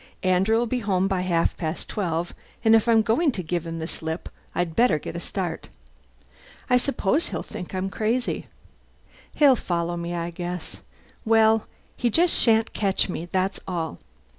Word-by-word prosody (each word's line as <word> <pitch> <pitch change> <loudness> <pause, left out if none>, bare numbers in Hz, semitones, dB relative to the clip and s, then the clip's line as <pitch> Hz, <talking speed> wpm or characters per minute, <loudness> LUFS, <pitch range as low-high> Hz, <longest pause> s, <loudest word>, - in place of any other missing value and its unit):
Andrew'll 195 +6 +3
be 250 +2 -1
home 195 -4 +1
by 190 -2 0
half 170 -2 +1
past 160 0 -4
twelve 175 -4 -2 0.3
and 225 0 +7
if 225 +1 +3
I'm 225 -1 +5
going 275 +8 +2
to 185 - -4
give 170 +1 -2
him 165 0 -4
the 160 - -3
slip 160 0 -4 0.3
I'd 175 -2 -1
better 230 -10 +4
get 150 - -7
a - - -2
start. 175 -2 -4 1.0
I 250 - +7
suppose 275 - 0
he'll - - -4
think 180 - -7
I'm 190 +1 -2
crazy! 230 +5 -1 0.9
He'll 285 -3 +6
follow 175 -5 -2
me, 170 0 -3
I 170 0 -3
guess. 175 0 -6 0.4
Well, 220 -1 +4 0.3
he 245 - +1
just 340 +9 +3
shan't 225 -1 +3
catch 195 -1 +1
me, 175 -1 -5
that's 190 +1 0
all!" 170 -3 -3
190 Hz, 165 wpm, -25 LUFS, 170-225 Hz, 1.0 s, and